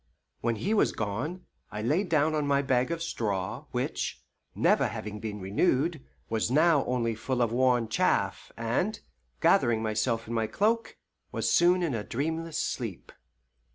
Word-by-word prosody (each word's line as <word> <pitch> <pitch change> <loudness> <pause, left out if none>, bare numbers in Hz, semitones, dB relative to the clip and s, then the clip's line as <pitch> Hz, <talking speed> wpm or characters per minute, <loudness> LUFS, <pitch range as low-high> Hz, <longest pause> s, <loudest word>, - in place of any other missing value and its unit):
When 115 0 0
he 200 - -1
was 215 - +3
gone, 125 - -3 0.3
I 105 +2 -4
lay 150 - +2
down 160 -4 +2
on 150 -2 0
my 140 0 +2
bag 130 -1 +1
of 165 0 -2
straw, 100 - -2
which, - - -3 0.3
never - - +3
having 105 0 -6
been 105 -2 -5
renewed, 135 - +1 0.2
was 110 0 0
now 155 +2 +4
only 120 -2 0
full 125 +3 -2
of 120 -2 +2
worn 125 -1 +2
chaff, 110 - 0
and, - - -1 0.4
gathering 115 -2 +3
myself 110 +1 0
in 115 - -4
my 110 -1 0
cloak, 225 - 0 0.3
was - - -1
soon 175 +1 +4
in 160 -6 0
a 110 -3 -2
dreamless 160 +7 -3
sleep. 115 - -3
125 Hz, 155 wpm, -28 LUFS, 110-160 Hz, 0.4 s, now